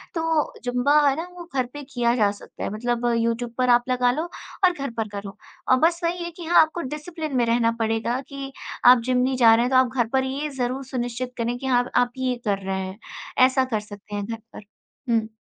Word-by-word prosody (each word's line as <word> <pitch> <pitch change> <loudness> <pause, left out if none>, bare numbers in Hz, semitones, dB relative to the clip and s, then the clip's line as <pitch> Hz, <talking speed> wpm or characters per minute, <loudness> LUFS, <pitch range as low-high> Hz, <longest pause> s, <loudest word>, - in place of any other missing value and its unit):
तो 325 -2 0
ज़ुम्बा 250 +4 +3
है 275 - +3
ना, 330 +3 -4
वो 345 - -8
घर 255 -2 +2
पे 290 - -7
किया 240 -1 +2
जा 205 -4 +3
सकता 205 - -10
है, - - -1
मतलब 240 +2 -2
यूट्यूब 230 +1 -1
पर 255 0 +2
आप 240 0 +5
लगा 250 -1 +3
लो 305 +6 -2 0.4
और 360 - +5
घर 275 -4 -4
पर 225 -1 -1
करो। 200 0 -7 0.3
और 255 - +5
बस 335 +1 +3
वही 345 +1 -1
है 345 - -5
कि 340 0 -10
हाँ, 345 +1 +6
आपको 320 +2 0
डिसिप्लिन 305 +1 -5
में 240 - +3
रहना 230 0 +2
पड़ेगा 225 +2 0
कि 275 -1 -6 0.3
आप 250 0 +9
जिम 255 0 +1
नहीं 255 +1 +1
जा 230 -3 +7
रहे 235 - +2
हैं, - - 0
तो 260 - +5
आप 255 -1 +4
घर 240 -3 +2
पर 265 0 +3
ये 280 +3 -3
ज़रूर 255 +2 -1
सुनिश्चित 245 -1 -4
करें 240 +1 -1
कि 265 - -8
हाँ, 245 -1 +2
आप 245 0 +3
ये 255 -1 0
कर 200 -1 +1
रहे 190 0 -2
हैं। 190 +1 -6 0.5
ऐसा 260 0 +2
कर 215 - +1
सकते 205 0 -10
हैं 205 - -3
घर 225 +1 -5 0.2
पर। - - -10 0.5
हुँ। 225 -1 +2
250 Hz, 235 wpm, -24 LUFS, 230-275 Hz, 0.5 s, आप